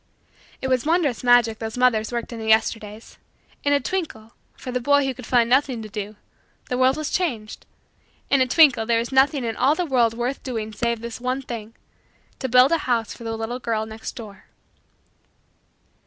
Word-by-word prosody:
It - - 0
was 255 -2 +1
wondrous 315 -6 0
magic 245 -3 +4
those 220 +1 -5
mothers 245 -3 +2
worked 235 0 -4
in 230 - -7
the 220 - -6
Yesterdays. 220 0 0 0.4
In 285 - +1
a 285 - +4
twinkle, 250 -9 -5 0.2
for 255 - -7
the 250 - -1
boy 285 +2 +3
who 265 - -1
could 250 -2 -11
find 240 -2 +3
nothing 255 -2 +1
to 215 - -9
do, 210 0 -6 0.5
the 250 - -1
world 260 +1 +3
was 310 -1 -4
changed. 240 -13 -3 0.6
In 275 - +3
a 255 - +3
twinkle, 255 -5 +4
there 235 -1 +3
was 235 +2 -2
nothing 270 +1 +3
in 225 -1 -3
all 275 +4 +2
the 360 - -1
world 240 -6 +2
worth 245 +3 -3
doing 220 -4 -5
save 235 +1 -2
this 235 +1 -7
one 255 +2 -2
thing 230 -2 -7 0.6
to 260 - -3
build 250 +3 +6
a 330 - +2
house 230 -2 0
for 235 - -12
the 225 -1 -4
little 225 +3 -4
girl 225 -3 -2
next 220 0 -8
door. 210 -4 -11
240 Hz, 195 wpm, -23 LUFS, 225-265 Hz, 0.6 s, build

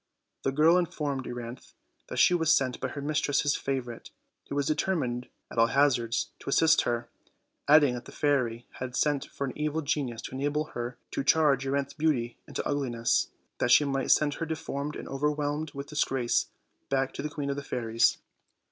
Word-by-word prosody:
The 135 - 0
girl 160 +5 +5
informed 145 -6 -2
Euryanthe 120 0 -7 0.3
that - - -6
she - - +6
was 160 -2 +3
sent 130 -5 +2
by 130 - -2
her 140 +2 -6
mistress' 145 -1 +1
favorite, 125 -4 -4 0.4
who - - -3
was 145 -1 +1
determined 145 -6 -1 0.2
at - - -2
all 115 - +6
hazards 120 -3 +2
to - - -7
assist 160 +3 +5
her; 120 0 -2 0.6
adding 145 -3 +6
that 120 - -6
the - - -11
fairy 125 -5 0
had 125 -1 -5
sent 145 -1 +1
for 140 - -4
an 130 - -5
evil 150 +1 -1
genius 135 -5 -2
to - - -6
enable 145 +3 -1
her 120 +1 -4
to - - -2
change 140 -2 +3
Euryanthe's 140 0 -1
beauty 130 -7 0
into - - -3
ugliness, 125 -5 +1 0.3
that 120 - +1
she 135 +4 +6
might 135 -1 -1
send 150 -1 +4
her 165 - -3
deformed 150 -2 -4
and - - -7
overwhelmed 150 +2 -1
with 140 +1 -6
disgrace 135 -5 +1 0.4
back 135 -1 0
to - - -5
the 150 - -3
Queen 145 -1 -3
of - - -2
the 145 - -5
Fairies. 115 -3 +1
140 Hz, 185 wpm, -28 LUFS, 125-150 Hz, 0.6 s, she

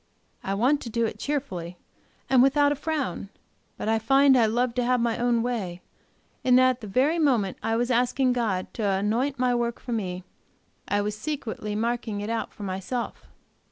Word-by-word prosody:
I 195 - -2
want 260 +8 +2
to 235 - -6
do 230 0 0
it - - -5
cheerfully 185 - -3 0.5
and 260 -2 +5
without 285 +2 +4
a - - +1
frown. 285 - -3 0.5
But - - -4
I 225 0 +2
find 270 +4 +5
I 235 -3 +4
love 240 +2 0
to 250 +1 0
have 250 +1 +2
my 235 -1 +1
own 240 -1 +2
way, 195 -8 -3 0.6
and 250 -1 +5
that 255 0 +6
at 255 0 -7
the 215 - -7
very 275 - +2
moment 240 - +1
I 225 - 0
was 240 +2 0
asking 250 +1 +2
God 215 -7 -2
to 200 -4 0
appoint 240 +7 0
my 250 -1 +2
work 235 -1 -1
for 250 - -8
me, 185 -5 -3 0.6
I 205 0 +1
was 210 0 -2
secretly 220 -4 -4
marking 230 -1 -2
it 205 +2 -3
out 230 - -2
for 210 - -10
myself. 195 +6 -4
235 Hz, 190 wpm, -26 LUFS, 210-255 Hz, 0.6 s, that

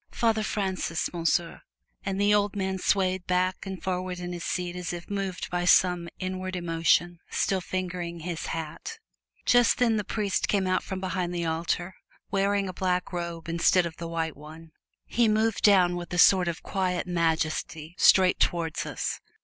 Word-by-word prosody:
"Father 225 -2 +1
Francis, 190 -6 -2
Monsieur!" 170 0 0 0.4
and 195 -1 -2
the 205 +1 +4
old 205 0 +2
man 190 -1 -2
swayed 185 -1 +1
back 185 +1 0
and 190 -1 -6
forward 185 -1 -2
in 175 0 -5
his 175 - -6
seat 180 -1 -2
as 180 0 -4
if 175 0 -7
moved 195 -2 -3
by 175 0 0
some 175 -1 +4
inward 185 0 -4
emotion, 170 0 +1
still 190 -1 0
fingering 175 -2 -4
his 170 0 -4
hat. 165 - -5 0.5
Just 245 -1 +4
then 230 -3 +3
the 210 - -1
priest 205 -2 -1
came 200 -2 +1
out 185 0 +1
from 190 - -5
behind 185 -2 -2
the 170 -1 -1
altar, 170 +3 -1 0.4
wearing 200 0 +1
a 185 - -5
black 180 0 -1
robe 170 -1 -4
instead 170 +2 +3
of 165 -1 -6
the 170 - -5
white 165 -2 -2
one. 155 +2 -12 0.3
He 235 -1 +2
moved 220 0 +1
down 185 -4 +5
with 175 -1 -6
a 180 - -2
sort 185 0 +6
of 170 -1 -3
quiet 185 -2 -1
majesty 160 -2 -1
straight 185 -1 +5
towards 165 -2 0
us. - - -3
180 Hz, 175 wpm, -27 LUFS, 170-190 Hz, 0.5 s, sort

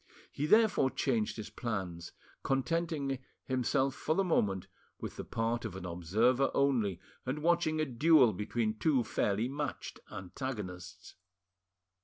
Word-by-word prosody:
He 150 - -2
therefore 215 -9 +5
changed 120 -6 0
his 110 - -6
plans, 95 -7 -4 0.3
contenting 140 -1 0 0.3
"himself 130 +1 +1
for 155 - -1
the 195 - +3
moment 100 - +1 0.3
with - - -6
the - - -5
part 115 +1 -1
of - - -5
an 95 -1 -6
observer 110 +10 +2
only, 115 -10 +2 0.2
and 140 +4 -3
watching 170 -2 +2
a 155 - +2
duel 135 -2 +5
between 110 +2 -2
two 135 -2 +3
fairly 105 +1 0
matched 145 +3 -4
antagonists. 95 -3 -6
125 Hz, 130 wpm, -32 LUFS, 100-145 Hz, 0.3 s, therefore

